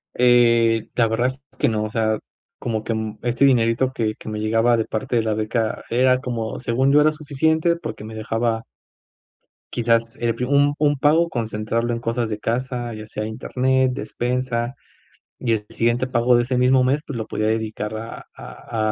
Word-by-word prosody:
Eh, 115 -2 +4
la 115 -2 +3
verdad 115 +3 +1
es 130 +1 -5 0.2
que 145 - +2
no, 110 -1 -1
o - - -4
sea, 110 -1 0 0.4
como 110 -3 -2
que, 115 - -2
mm, 110 -1 -4
este 120 +3 +2
dinerito 125 0 +2
que 110 -3 -1
que - - -9
me 105 0 -4
llegaba 115 +2 +2
de 110 - 0
parte 125 +3 -3
de 115 - +3
la 110 -1 0
beca, 110 +1 -1
era 125 +1 +3
como 115 -4 -4
según 130 +4 +1
yo, 150 - +6
era 155 +1 +4
suficiente 160 +3 +1
porque 170 - -7
me 110 +1 -8
dejaba 115 +1 -1 1.1
quizás 115 -1 +1
el 115 -1 0
pri 125 - -2
un 145 +2 +3
un 145 -1 +2
pago 160 +5 +3
concentrarlo 115 -1 -2
en 115 - -2
cosas 115 0 -1
de 105 - -3
casa, 120 +1 -2
ya 110 0 -8
sea 105 0 -4
Internet, 130 +3 0
despensa, 125 -1 -2 0.6
y 120 -3 +1
el 105 -2 -2
siguiente 120 +2 +1
pago 120 0 +3
de 120 - +2
ese 125 +1 -2
mismo 130 +1 +4
mes, 135 +4 +1
pues, 140 - -4
lo 110 - -3
podía 110 - -1
dedicar 110 -1 -2
a 115 +1 -8
a 110 -2 -4
120 Hz, 190 wpm, -22 LUFS, 110-130 Hz, 1.1 s, yo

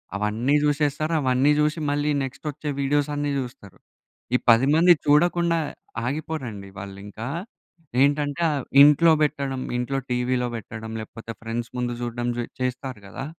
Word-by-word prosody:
అవన్నీ 110 +7 +1
చూసేస్తారు. 150 +1 +1
అవన్నీ 130 +2 +3
చూసి 150 +2 +1
మళ్ళీ 145 +1 0
నెక్స్ట్ 135 +3 -7
వచ్చే 150 +1 -5
వీడియోస్ 145 +1 +1
అన్నీ 145 0 -1
చూస్తరు. 120 -7 -8 0.6
ఈ - - +6
10 115 +4 +6
మంది 175 +2 +7
చూడకుండా 170 +3 +3 0.5
ఆగిపోరండి 130 -8 -4
వాళ్ళు 95 +1 -8
ఇంకా 110 +3 -7 0.7
ఏంటంటే 145 +2 +2 0.4
ఇంట్లో 150 +3 +6
పెట్టడం, 140 -3 0 0.2
ఇంట్లో 125 +3 -1
టీవీలో 125 0 0
పెట్టడం 110 0 -7
లేకపోతే 115 +1 -8
ఫ్రెండ్స్ 115 +1 -4
ముందు 120 -1 -1
చూడడం 120 0 -2 0.3
చేస్తారు 125 -2 -3
కదా! 95 - -6
135 Hz, 130 wpm, -24 LUFS, 120-150 Hz, 0.7 s, మంది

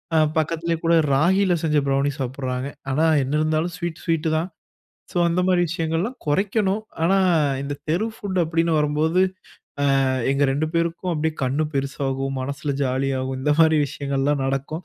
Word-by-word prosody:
அ - - +5 0.2
பக்கத்திலேயே 165 +1 0
கூட 165 0 +3 0.2
ராகில 185 +6 +3
செஞ்ச 155 -2 +2
ப்ரௌனி 140 +1 +1
சாப்பிடுறாங்க. 130 0 -3 0.2
ஆனா, 140 +4 +1 0.2
என்ன 135 - -3
இருந்தாலும் 155 +2 0
ஸ்வீட், 170 -1 -5
ஸ்வீட்டு 165 -1 0
தான். 170 +4 -2 0.6
ஸோ, - - -11
அந்த 170 +2 +1
மாரி 180 -1 +3
விஷயங்கள்லாம் 165 +8 -2
குறைக்கணும். 195 +5 +1 0.2
ஆனா, 195 +3 +3 0.4
இந்த 145 +1 -3
தெரு 175 +8 +1
ஃபுட் 190 -2 -3
அப்படின்னு 165 +1 0
வரும்போது, 155 +4 +2 0.6
அ 145 - +3 0.5
எங்க 140 +1 +2
2 150 +3 -1
பேருக்கும் 170 +2 -1
அப்படியே 160 0 -1
கண்ணு 140 +4 0
பெருசாகும், 135 0 -2
மனசுல 140 +1 -3
ஜாலியாகும். 130 0 -1
இந்த 150 +2 +2
மாதிரி 160 -1 +5
விஷயங்கள்லா 140 +1 -1
நடக்கும் 135 +5 -3
155 Hz, 150 wpm, -22 LUFS, 135-170 Hz, 0.6 s, அ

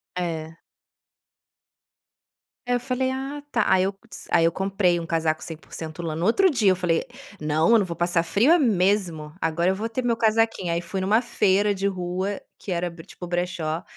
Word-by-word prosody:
É. 165 -2 -4 2.1
É, 245 - 0
eu - - 0
falei: 260 +1 -1
"Ah 270 +2 -4
tá." - - +2
Aí 185 - +4
eu 195 +1 -1
dis - - -11
aí 165 - +4
eu 165 - +3
comprei 190 -2 +1
um 165 - -5
casaco 160 -1 0
100% 160 0 -8
lã, 160 -2 -3
no 165 +2 -2
outro 370 - +4
dia 225 - +3
eu - - +2
falei: 175 -3 0 0.4
"Não, 155 +4 +2
eu 230 - +7
não 200 - +1
vou 170 - -5
passar 175 0 +1
frio 225 - +3
é 345 - +6
mesmo, 185 - +1
agora 165 +2 +1
eu - - -1
vou 215 +4 -3
ter 250 +3 -3
meu 235 -1 +1
casaquinho." 225 -5 +1
Aí 170 - -1
fui 185 +3 -4
numa 210 +5 +3
feira 205 -4 +2
de 195 +1 -1
rua 185 +1 -2 0.2
que 195 - -7
era 175 0 -1
bre 165 -1 -12
tipo 180 - -9
o - - -8
brechó 175 -2 -2
185 Hz, 200 wpm, -24 LUFS, 170-220 Hz, 2.1 s, eu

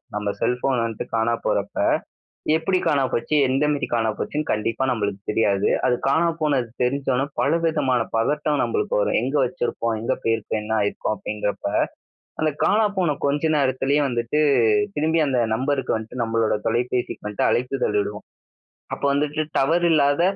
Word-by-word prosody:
நம்ம 105 -1 -2
cell 125 +2 +2
phone 135 -1 0
வந்ட்டு 115 -2 -4
காணா 115 +1 +1
போறப்ப, - - -1 0.8
எப்பிடி 185 +3 +1
காணா 140 -3 +3
போச்சு? 150 - -1
எந்த 135 +3 +1
மேரி 145 - -2
காணா 115 -2 +1
போச்சுன்னு 150 +1 -2
கண்டிப்பா 115 +4 -1
நம்பளுக்கு 100 -4 -2
தெரியாது. 100 -3 +2 0.2
அது 125 - +2
காணா 160 +5 +3
போனது 135 -6 +1
தெரிஞ்சோனே 135 0 0
பலவிதமான 150 -3 +1 0.2
பதட்டம் 145 +5 +1
நம்பளுக்கு 440 +3 -1
வரும். - - +1
எங்க 135 +4 -2
வச்சுருப்போம்? 115 -2 -2
எங்க 120 - 0
போயிருக்கும்? 115 -1 -1
என்ன 105 +1 -5
ஆயிருக்கும்? 100 +1 -1
அப்படிங்கிறப்பா, 105 0 -3 0.7
அந்த 155 -1 +2
காணா 215 +1 +3
போன 160 -6 +1
கொஞ்ச 145 +2 0
நேரத்துலயே 135 +1 +1
வந்துட்டு 120 +4 -1 0.6
திரும்பி 160 +2 +1
அந்த 130 -2 +1 0.2
நம்பருக்கு 135 -1 0
வந்ட்டு 115 +2 -5
நம்பளோட 115 -1 +1
தொலைபேசிக்கு 120 0 -2
வந்ட்டு 105 - 0
அழைப்பிதழ் 125 -4 0
இடுவோம். 105 +1 -7 0.7
அப்பா - - -3
வந்துட்டு 150 +2 0 0.2
டவர் 165 +6 +2
இல்லாத 145 -1 +3
130 Hz, 145 wpm, -23 LUFS, 115-150 Hz, 0.8 s, காணா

